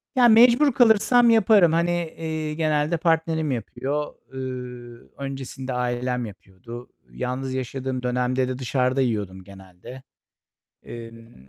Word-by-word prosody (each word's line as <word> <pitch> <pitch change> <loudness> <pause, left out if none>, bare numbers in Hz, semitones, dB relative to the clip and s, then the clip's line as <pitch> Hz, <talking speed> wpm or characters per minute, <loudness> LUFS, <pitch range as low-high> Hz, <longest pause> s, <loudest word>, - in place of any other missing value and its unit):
Ya, 245 -2 +6
mecbur 240 +5 +6
kalırsam 235 +1 +5
yaparım. 215 -6 +5
Hani, 170 +1 +1 0.3
eee, 160 -1 -3
genelde 155 +1 0
partnerim 160 -2 0
yapıyor. 135 +5 -3 0.2
Iıı, 125 -2 -8
öncesinde 135 -1 -6
ailem 125 0 -2
yapıyordu. 105 +4 -11 0.2
Yalnız 130 +1 -4
yaşadığım 130 0 -4
dönemde 125 +1 0
de 130 0 -4
dışarıda 130 +1 0
yiyordum 100 -6 -2
genelde. 95 +6 -13 0.8
Emm, 115 - -12
130 Hz, 110 wpm, -23 LUFS, 120-160 Hz, 0.8 s, Ya